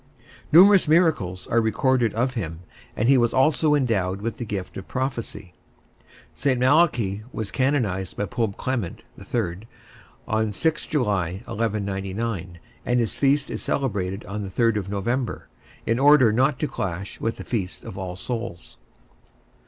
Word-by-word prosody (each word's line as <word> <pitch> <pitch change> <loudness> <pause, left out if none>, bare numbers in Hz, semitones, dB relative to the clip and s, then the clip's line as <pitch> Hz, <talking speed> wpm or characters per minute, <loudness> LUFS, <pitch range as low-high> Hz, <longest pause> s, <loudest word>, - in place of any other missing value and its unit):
Numerous 190 +3 +7
miracles 150 - +2
are 115 - +2
recorded 115 +1 +2
of 125 +3 0
him, 85 -8 -4 0.4
and 110 - +1
he 135 -1 +6
was 120 -1 +1
also 150 +3 +3
endowed 100 -9 0
with 115 +2 -4
the 120 - -3
gift 100 -3 -5
of 95 - -8
prophecy. 120 -8 -4 0.8
St. 130 - 0
Malachy 125 - +3
was 110 -2 -5
canonized 110 -10 0
by 100 - 0
Pope 110 -2 -2
Clement 120 -9 -3 0.2
(III), 95 -8 -2 0.7
on 110 -1 0
6 160 +10 -1
July, 100 - -1
1199, 100 -4 -3 0.3
and 120 0 +1
his 115 -3 0
feast 140 +1 +1
is - - -4
celebrated 100 -7 -2
on 100 +1 -5
3 115 +4 +2 0.2
November, 120 +5 -2 0.4
in 115 +2 +1
order 140 -4 +6
not 130 +4 +2
to 150 - -1
clash 95 -3 -5
with 115 - -1
the - - -7
Feast 100 -6 -4
of - - -8
All 95 -2 -5
Souls. 115 -4 -6
115 Hz, 145 wpm, -24 LUFS, 95-130 Hz, 0.8 s, Numerous